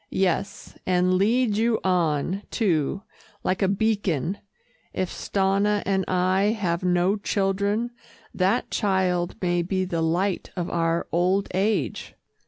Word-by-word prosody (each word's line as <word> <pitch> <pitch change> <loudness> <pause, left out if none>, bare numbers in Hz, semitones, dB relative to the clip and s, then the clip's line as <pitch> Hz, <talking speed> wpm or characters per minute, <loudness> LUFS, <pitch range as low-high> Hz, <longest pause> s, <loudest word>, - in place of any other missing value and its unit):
"Yes, 190 0 -1
and 180 0 +2
leads 215 +3 +2
you 230 0 +2
on, 175 0 +1
too, 190 - 0 0.4
like 185 - 0
a 195 - +3
beacon. 195 -4 0 0.5
If 185 - -2
Stanna 200 +1 +1
and 190 -1 +1
I 185 +4 +2
have 170 -3 0
no 180 +3 +2
children, 200 +3 0 0.4
that 195 +6 +1
child 185 -4 0
may 175 -1 +2
be 185 +2 -1
the 170 -3 -2
light 175 +4 0
of 175 -2 -3
our 165 0 0
old 185 +3 +1
age." 200 +4 -1
190 Hz, 125 wpm, -25 LUFS, 175-200 Hz, 0.5 s, a